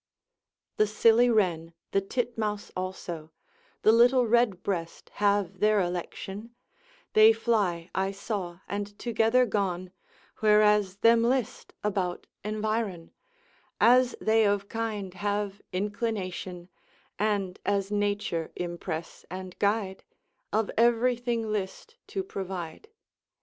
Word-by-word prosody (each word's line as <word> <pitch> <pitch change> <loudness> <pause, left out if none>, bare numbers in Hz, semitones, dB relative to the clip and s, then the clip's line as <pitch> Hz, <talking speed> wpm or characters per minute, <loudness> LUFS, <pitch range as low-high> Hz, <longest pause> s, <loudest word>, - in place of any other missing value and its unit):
The 215 - +4
silly 230 +3 +4
wren, 170 -7 +1 0.2
the 195 - +2
titmouse 215 -1 -3
also, 175 -4 -5 0.5
The 215 - +7
little 245 +2 +5
redbreast 200 -7 0
have 200 -3 +1
their 210 +1 +4
election, 195 +5 -4 0.6
They 215 +1 +8
fly 205 -7 0
I 190 0 0
saw 195 -3 -5
and 205 0 -4
together 235 +2 +2
gone, 185 -4 -2 0.5
Whereas 210 -2 +4
hem 230 0 +6
list, 245 0 -1
about 190 -4 -1 0.2
environ 215 -4 -2 0.7
As 250 +1 +5
they 220 0 +3
of 200 0 0
kinde 215 -5 -3
have 205 +1 -2
inclination, 190 -3 -3 0.5
And 200 -3 0
as 200 0 0
nature 205 -5 -1
impress 170 -2 -5
and 185 0 -7
guide, 200 -2 0 0.5
Of 215 0 0
everything 235 -1 +2
list 210 - -4
to 390 - -3
provide. 190 - -6
205 Hz, 105 wpm, -28 LUFS, 185-225 Hz, 0.7 s, They